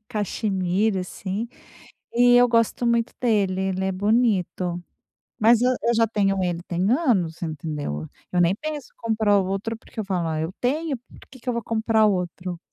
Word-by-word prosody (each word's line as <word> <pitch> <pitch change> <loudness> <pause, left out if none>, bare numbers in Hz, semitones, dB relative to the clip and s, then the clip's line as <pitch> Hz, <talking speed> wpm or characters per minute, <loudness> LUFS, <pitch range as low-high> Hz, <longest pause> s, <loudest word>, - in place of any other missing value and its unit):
caxemira, 200 -2 0
assim, 195 +4 -4 0.7
e 245 +1 +6
eu 245 - +7
gosto 230 +1 +2
muito 235 0 +1
dele. 200 -6 +1
Ele 190 0 -1
é 190 - +1
bonito. 190 -4 +1 0.6
Mas 230 +2 +5
eu 250 - +4
eu 255 - +1
eu 235 - +3
já 230 0 +4
tenho 195 -3 +1
ele 175 -1 -2
tem 185 +3 0
anos, 215 - +1
entendeu? 150 - -4 0.2
Eu 180 - +1
nem 175 +2 +3
penso 305 0 -6
em - - -48
comprar 220 -3 +2
outro 195 +4 -2
porque 225 - -18
eu - - -3
falo: 180 -4 -1
"Ah, 155 -1 -1
eu 160 +3 -3
tenho 290 +3 0
por 250 - -19
que 260 -2 -14
que 250 - -9
eu - - +2
vou 235 - -2
comprar 220 0 +2
outro?" 180 -2 -2
205 Hz, 185 wpm, -24 LUFS, 180-235 Hz, 0.7 s, eu